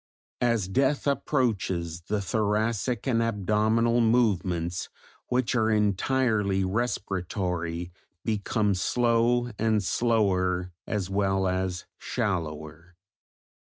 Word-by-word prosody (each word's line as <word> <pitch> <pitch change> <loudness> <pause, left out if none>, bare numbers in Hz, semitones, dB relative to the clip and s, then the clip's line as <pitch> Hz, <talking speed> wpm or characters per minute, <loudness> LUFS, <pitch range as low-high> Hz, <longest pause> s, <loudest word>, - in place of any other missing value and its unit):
As 115 -6 +2
death 135 +8 +1
approaches 100 - 0
the 105 -1 0
thoracic 110 +3 0
and 115 -3 +2
abdominal 115 +2 +2
movements 95 -7 +1 0.4
which 125 +1 0
are 110 -3 +2
entirely 105 -1 +1
respiratory 90 -5 -2 0.3
become 105 -1 0
slow 120 +4 +2
and 110 -2 +2
slower 95 -5 +1
as 100 -3 -2
well 95 -1 +1
as 95 -1 -2
shallower. 80 -2 -4
105 Hz, 90 wpm, -27 LUFS, 90-115 Hz, 0.4 s, As